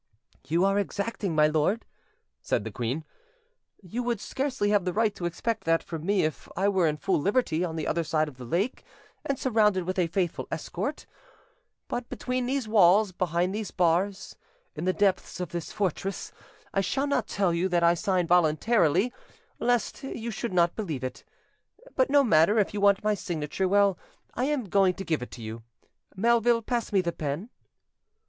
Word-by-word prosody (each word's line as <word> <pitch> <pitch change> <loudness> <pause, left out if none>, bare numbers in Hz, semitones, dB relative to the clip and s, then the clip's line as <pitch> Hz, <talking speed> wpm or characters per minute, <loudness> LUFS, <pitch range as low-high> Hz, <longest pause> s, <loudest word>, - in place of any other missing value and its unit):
"You 170 +4 +2
are 195 +1 +2
exacting, 200 -2 -2
my 150 0 +5
lord," 155 +9 +1 0.6
said - - 0
the 110 - -6
queen: 125 +9 -3 0.8
"you 205 +7 -4
would 240 -3 -1
scarcely 260 -1 -1
have 205 -3 +3
the 180 0 -2
right 215 +1 +2
to 175 - -6
expect 220 +6 -2
that 165 0 +2
from 165 0 -6
me 200 -1 +3
if 155 0 -3
I 195 +2 +3
were 190 -4 +2
in 150 -1 -1
full 185 -1 0
liberty 195 - +1
on 165 -3 -3
the 160 - -3
other 170 +1 0
side 155 -1 +1
of 140 -4 -10
the 130 - -9
lake 185 - -1 0.4
and 275 - -1
surrounded 215 -8 +2
with 185 +2 -2
a 175 - +2
faithful 175 0 -2
escort; - - -4 0.8
but 240 0 -4
between 250 -1 -2
these 265 -3 -1
walls, 205 -1 +5
behind 180 +1 0
these 215 -1 -3
bars, 180 +3 0 0.4
in - - -5
the 185 - +3
depths 195 -2 0
of 180 -2 -3
this 170 -2 -5
fortress, 195 -1 -2 0.4
I 195 - +2
shall 265 +9 0
not 265 -6 0
tell 190 -4 +1
you 175 +3 0
that 175 -1 +2
I 170 0 +6
sign 180 +1 0
voluntarily, 180 +5 +3 0.5
lest 245 +1 0
you 235 -4 -5
should 230 +1 -4
not 175 -1 +2
believe 160 - -4
it. 130 - -5 0.7
But 260 0 +2
no 285 0 +5
matter, 205 0 +4
you 205 - -4
want 200 0 +4
my 215 0 +2
signature; 175 -1 -2
well, 200 -1 +3 0.3
I 250 - -1
am 280 -6 -1
going 190 -1 +3
to 195 - -6
give 160 -5 0
it 125 - -6
to 120 - -10
you. 110 +1 -6 0.5
Melville, 230 +2 +3
pass 240 0 -2
me 195 -2 +3
the 170 -1 -2
pen." 155 - -4
190 Hz, 185 wpm, -27 LUFS, 170-220 Hz, 0.8 s, I